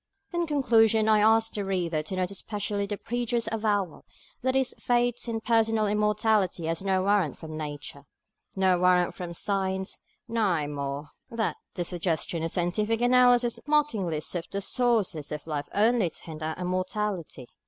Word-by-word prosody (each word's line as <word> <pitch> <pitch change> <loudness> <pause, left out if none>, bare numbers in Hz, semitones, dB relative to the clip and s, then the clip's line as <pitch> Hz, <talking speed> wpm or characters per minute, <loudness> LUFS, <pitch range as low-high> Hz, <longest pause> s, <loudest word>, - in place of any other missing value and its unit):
In 345 -1 0
conclusion, 225 -7 +3
I 215 -1 +5
ask 225 +1 +4
the 205 - -2
reader 175 -5 -1
to 155 +5 -5
note 185 +1 -1
especially 205 0 -3
the 205 0 -3
preacher's 240 0 -2
avowal 205 -6 -1 0.4
that 260 +1 0
his 265 -2 +1
faith 245 0 0
in 225 -1 -2
personal 225 -1 +2
immortality 210 -3 +1
has 165 +2 -1
no 190 -1 +1
warrant 195 -8 +2
from 155 -1 -8
Nature, 145 -2 -7 0.5
no 190 -2 +3
warrant 180 -1 +3
from 175 -2 -6
Science; 190 0 -1 0.3
nay, 195 -9 +1
more, 140 0 -4 0.2
that 230 -1 -2 0.2
the 175 - -1
suggestions 170 -1 -1
of - - -1
scientific 210 +6 0
analysis 245 -1 +4
"mockingly 220 - +1
sift 170 +3 -5
the 200 - -1
sources 220 - +1
of 150 -1 -5
life 150 -3 -3
only 220 -2 +3
to - - -11
hint 160 -2 -8
our 160 +3 -3
mortality." 185 -5 -3
200 Hz, 155 wpm, -27 LUFS, 170-225 Hz, 0.5 s, I